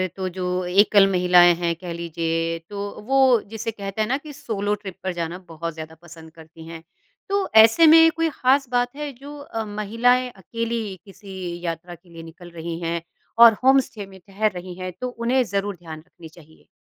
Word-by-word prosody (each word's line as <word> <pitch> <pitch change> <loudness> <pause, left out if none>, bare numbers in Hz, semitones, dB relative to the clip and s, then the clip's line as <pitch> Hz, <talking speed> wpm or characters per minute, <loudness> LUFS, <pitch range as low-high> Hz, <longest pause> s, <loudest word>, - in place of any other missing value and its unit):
तो 190 -1 -4
जो 180 0 -3
एकल 200 +2 +4
महिलाएँ 180 -1 +5
हैं 170 0 -2
कह 175 0 -7
लीजिए, 165 0 -2
तो 200 +4 -8
वो 265 -3 +4
जिसे 225 +1 -4
कहते 200 0 -5
हैं 215 - 0
ना 265 +4 0
कि 295 +1 -11
सोलो 215 -8 -3
ट्रिप 195 -3 -10
पर 190 - -2
जाना 170 0 -4
बहुत 165 0 -6
ज़्यादा 160 0 -9
पसंद 165 -2 -14
करती 160 0 -15
हैं। 165 0 -10 0.5
तो 400 0 0
ऐसे 225 +9 +7
में 325 +1 +8
कोई 330 +1 -1
खास 270 -1 +1
बात 245 +1 -1
है 295 0 -5
जो 285 +4 -11
अ, 225 -5 -5
महिलाएँ 230 +5 +1
अकेली 230 0 -5
किसी 190 -3 -8
यात्रा 170 +1 -5
के 175 +1 -24
लिए 165 -1 -11
निकल 170 +2 -13
रही 165 0 -6
हैं 170 0 -3 0.4
और 230 -1 +9
होम 265 +1 +6
स्टे 220 -5 -6
में 190 -1 -15
ठहर 200 +4 -2
रही 180 -1 -8
हैं, 185 0 -5
तो 255 - -2
उन्हें 245 +2 0
ज़रूर 200 -2 -3
ध्यान 160 -3 -10
रखनी 165 0 -15
चाहिए? 160 -1 -20
195 Hz, 195 wpm, -22 LUFS, 170-235 Hz, 0.5 s, और